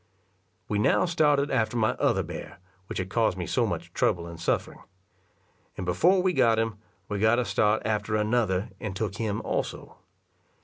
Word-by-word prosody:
We 105 - -1
now 105 - +3
started 150 -5 +2
after 115 -2 +1
my 110 -1 +3
other - - +2
bear, - - -8 0.3
which - - -5
had 95 0 -3
caused 110 -5 +1
me 90 - -3
so - - +1
much - - -5
trouble 85 -1 +1
and 85 -1 -9
suffering; 85 - -1 1.0
and 95 - -4
before 175 - +3
we 185 -1 +2
got 115 -6 +4
him, 110 -2 -1 0.3
we 105 -1 -3
got 110 +3 +4
a 125 - +1
start 105 0 +1
after 110 0 -1
another, 105 -3 0
and 105 -3 -5
took 105 0 -3
him 110 -3 -2
also. - - -4
110 Hz, 175 wpm, -27 LUFS, 100-120 Hz, 1.0 s, got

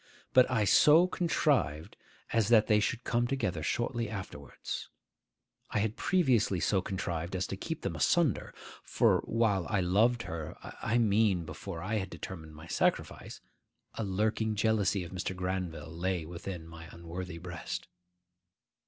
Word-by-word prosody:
But 130 -1 +6
I 115 -4 +2
so 150 - +6
contrived 140 - 0 0.4
as 115 -3 +3
that 110 -2 +6
they 105 -1 +4
should 120 +3 -1
come 120 0 +1
together 95 -11 -1
shortly 120 - -1
afterwards. 95 - -6 0.8
I - - -2
had 105 +1 0
previously 125 - +2
so 95 +2 +2
contrived 90 -2 -3
as 95 0 0
to - - -4
keep 160 - -5
them - - -2
asunder; 170 -5 +2 0.3
for - - +3
while 105 -6 +1
I 105 - +1
loved 110 +7 +3
her,—I 85 +7 -4
mean 105 -5 +3
before 85 0 -7
I 110 +2 -1
had 95 -2 -3
determined 80 -5 -8
on - - -14
my 80 - -10
sacrifice,—a 85 +6 -3
lurking 110 +2 0
jealousy 105 -3 +1
of 85 - -9
Mr. 95 0 -3
Granville 90 -4 -4
lay 90 -1 -1
within 85 0 -7
my 80 0 -10
unworthy 85 +1 -7
breast. 85 0 -6
95 Hz, 145 wpm, -31 LUFS, 85-115 Hz, 0.8 s, But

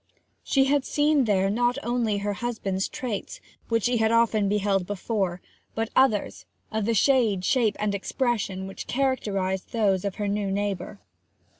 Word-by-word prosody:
She 270 - +2
had 280 0 +2
seen 295 -2 +2
there 195 -3 +2
not 240 +3 +1
only 235 -3 0
her 205 0 -2
husband's 200 -4 -2
traits, 230 -6 -5 0.3
which 230 -2 +1
she 245 0 +2
had 220 0 +2
often 230 -3 +3
beheld 200 -3 +1
before, 195 -3 -2 0.3
but 225 0 -2
others, 260 -6 +2 0.2
of 220 -1 -1
the 230 +1 +1
shade, 220 -6 +3
shape, 230 -4 +2
and 210 -1 0
expression 200 -2 -1
which 195 - -8
characterized 200 -8 -1
those 200 -5 +2
of 200 -2 -3
her 205 -1 -2
new 200 0 -1
neighbour. 200 0 -3
210 Hz, 155 wpm, -26 LUFS, 195-240 Hz, 0.3 s, often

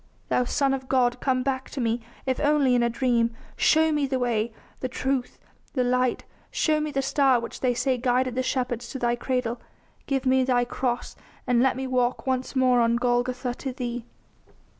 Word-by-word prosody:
Thou 250 - +2
Son 275 +2 +1
of 260 -1 -4
God, 250 -2 +2
come 255 -1 +1
back 260 -1 -2
to 280 - -6
me, 230 -1 0 0.2
if 260 -1 0
only 290 -3 +3
in 245 - +3
a 235 - +2
dream... 235 -2 +1 0.2
show 320 0 +4
me 295 -2 +1
the 265 -1 0
way, 235 -2 0 0.3
the 255 - -3
truth, 260 0 -2 0.4
the 255 - +1
light; 250 0 +1 0.3
show 310 -1 +1
me 305 0 -2
the 275 -2 -1
star 270 -2 +3
which 235 - -7
they 250 -2 +1
say 255 0 0
guided 250 0 +1
the 255 - 0
shepherds 245 -2 -2
to - - -5
Thy 240 -1 +1
cradle... 245 -1 -2 0.5
give 270 -1 -1
me 260 0 +4
Thy 245 -1 +2
cross, 245 0 -3 0.3
and 245 -2 +3
let 265 -1 +3
me 265 - -3
walk 250 -1 0
once 260 0 -1
more 255 -2 +4
on 230 0 +3
Golgotha 245 +1 0
to 265 +1 -5
Thee." 245 -2 -5
255 Hz, 195 wpm, -25 LUFS, 245-265 Hz, 0.5 s, show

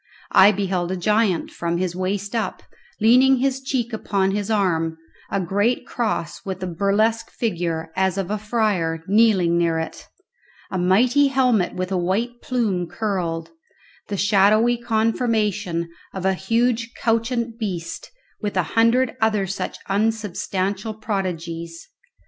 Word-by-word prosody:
I 190 +2 +8
beheld 185 -3 -1
a 190 - -2
giant, 210 -1 +1
from 170 0 -2
his 180 -1 -2
waist 195 +3 -2
up, 220 -5 -2 0.4
leaning 255 +5 +5
his 265 +1 0
cheek 255 -3 -2
upon 195 -3 0
his 205 +1 -2
arm; 165 -6 +1 0.3
a - - 0
great 205 +7 0
cross 215 -8 -3
with 190 -1 -5
a - - 0
burlesque 200 +6 +1
figure, 170 -7 -2
as 190 0 +1
of 195 0 -2
a 210 - -1
friar, 205 -7 0
kneeling 195 -4 +3
near 165 -1 +1
it; 160 - -5 0.6
a 190 - -1
mighty 240 +11 +4
helmet 250 -8 +2
with 185 +1 -3
a 190 - +1
white 220 +7 -1
plume 210 -9 -1
curled; 170 -6 -3 0.6
the 200 - -3
shadowy 210 +4 +4
conformation 220 -6 0 0.3
of 190 -1 -4
a 190 - +3
huge 230 +4 0
couchant 230 0 0
beast, 180 -7 -4 0.3
with 205 -3 -3
a 185 - +3
hundred 230 +2 +3
other 215 -3 +2
such 190 +1 -4
unsubstantial 205 0 -1
prodigies. 170 -6 -4
200 Hz, 135 wpm, -22 LUFS, 180-225 Hz, 0.6 s, I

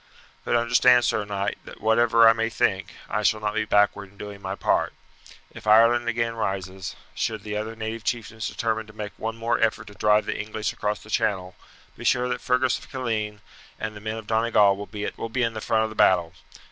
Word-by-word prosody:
"But - - 0
understand, 120 +1 +5
sir 105 0 0
knight, 100 0 -3
that - - -12
whatever 115 +1 +5
I 115 - +8
may 115 0 -1
think, 95 -3 -1
I - - -1
shall 110 - +2
not 105 -1 -2
be 110 0 0
backward 105 -1 +2
in 100 - -23
doing 100 -1 -8
my 95 0 -4
part. - - +1 0.6
If - - -11
Ireland 115 +2 +5
again 115 0 -1
rises, 95 -5 -4 0.2
should 110 -3 -2
the 105 -1 -5
other 110 +2 -4
native 110 0 -5
chieftains 110 -2 -3
determine 110 -1 -2
to 110 - -14
make 105 -1 -6
one 115 0 -3
more 115 +1 0
effort 110 -1 +1
to - - -13
drive 105 +2 +3
the - - -3
English 110 0 -3
across 105 0 -2
the 105 - -12
channel, 95 -5 0 0.4
be - - -10
sure 125 0 +2
that 125 - -2
Fergus 125 0 +1
of - - -15
Killeen 110 -5 -3 0.4
and 110 0 -4
the 105 - -9
men 110 +1 -4
of 110 - -8
Donegal 110 -2 +3
will 105 +2 -5
be 125 +2 0
in 115 -1 0
the 110 - -5
front 110 0 +1
of 110 - -2
the - - -9
battle. 85 -5 +3
110 Hz, 210 wpm, -25 LUFS, 105-115 Hz, 0.6 s, I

